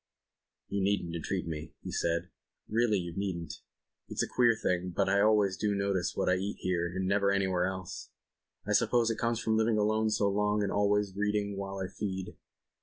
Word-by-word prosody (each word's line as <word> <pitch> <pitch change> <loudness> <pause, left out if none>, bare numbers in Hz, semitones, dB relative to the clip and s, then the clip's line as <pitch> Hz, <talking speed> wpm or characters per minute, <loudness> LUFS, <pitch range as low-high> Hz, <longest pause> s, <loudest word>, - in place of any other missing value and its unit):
'" - - -60
"You 100 - -1
needn't 95 -4 0
entreat 90 +3 -2
me," 80 -1 -6 0.2
said 85 0 0 0.4
he. - - -13
"Really 115 -3 +3
you 85 -2 -4
needn't. 85 -6 -4 0.5
It's - - -1
a - - -2
queer 120 -2 +3
thing 90 -3 0
but 100 - +2
I 100 +1 +3
always 105 -3 +3
do 105 -1 0
notice 100 -2 0
what - - 0
I 90 - +3
eat 100 +2 -3
here 90 -2 0
and 95 +2 -3
never 100 0 +3
anywhere 95 -2 +1
else. 95 -1 -6 0.6
I - - 0
suppose 115 -1 +3
it 110 - -4
comes 115 -1 -1
of 110 - +2
living 110 0 +2
alone 110 +1 +2
so 105 -1 +2
long 105 +1 +1
and 100 - -1
always 100 -1 +1
reading 105 0 0
while 100 0 -5
I 95 -1 -3
feed 95 -2 -5
100 Hz, 195 wpm, -30 LUFS, 95-105 Hz, 0.6 s, Really